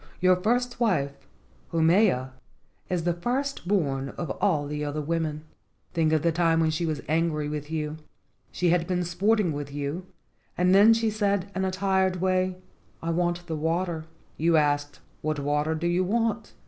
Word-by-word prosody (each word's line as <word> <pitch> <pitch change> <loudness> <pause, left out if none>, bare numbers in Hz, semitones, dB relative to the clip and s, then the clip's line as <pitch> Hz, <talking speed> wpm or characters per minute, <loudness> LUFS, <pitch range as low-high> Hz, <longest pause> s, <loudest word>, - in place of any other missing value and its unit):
Your 185 0 +5
first 245 +6 0
wife, 160 - +1 0.6
Haumea, 165 - +3 0.6
is 180 -2 -1
the 175 0 +1
first 250 +5 -2
born 140 -9 0
of 170 - -3
all 155 -7 +2
the 150 +1 -4
other 145 +1 -3
women. 155 0 -2 0.5
Think 160 -2 +2
of 155 -2 +2
the 170 - +3
time 165 0 +2
when 160 -1 +2
she 165 +2 -1
was 155 -2 -3
angry 155 -1 0
with 150 0 -5
you. 155 -1 -3 0.5
She 180 - +1
had 170 -1 +1
been 180 -1 0
sporting 190 +2 +1
with 145 -1 -5
you 145 +6 -4 0.5
and 180 +1 +3
then 210 +4 +7
she 225 -1 +1
said 200 -2 0
in 190 0 0
a - - +1
tired 190 0 +1
way, 185 0 0 0.5
T 165 - -2
want 175 +1 0
the 165 -2 -3
water.' 165 +1 -1 0.3
You 165 +1 +3
asked, 145 -1 0 0.2
'What 155 0 -1
water 150 +2 0
do 160 +2 -3
you 175 +2 +2
want? 225 +2 -1
170 Hz, 175 wpm, -26 LUFS, 155-185 Hz, 0.6 s, then